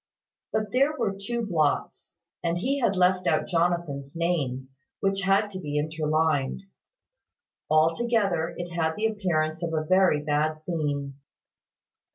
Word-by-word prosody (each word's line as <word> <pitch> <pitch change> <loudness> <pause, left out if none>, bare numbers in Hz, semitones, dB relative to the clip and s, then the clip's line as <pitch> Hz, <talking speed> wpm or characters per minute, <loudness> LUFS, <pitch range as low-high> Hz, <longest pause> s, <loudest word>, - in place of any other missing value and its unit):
But 215 -2 -1
there 275 +4 +2
were 215 -6 -1
two 230 +4 -3
blots; 155 -7 -1 0.3
and 170 0 0
he 270 +10 0
had 215 -6 +2
left 185 0 +2
out 155 - +2
Jonathan's 165 -5 -1
name, 140 -7 -1 0.3
which 195 0 0
had 195 +2 +2
to 185 - -6
be 150 -4 -3
interlined. 155 0 0 1.1
Altogether, 170 +2 +2
it 175 0 -5
had 160 -1 0
the 215 - -1
appearance 170 -7 0
of 170 -1 -2
a 155 0 -1
very 185 -3 +4
bad 155 +1 0
theme. 145 -5 -2
170 Hz, 135 wpm, -26 LUFS, 155-195 Hz, 1.1 s, very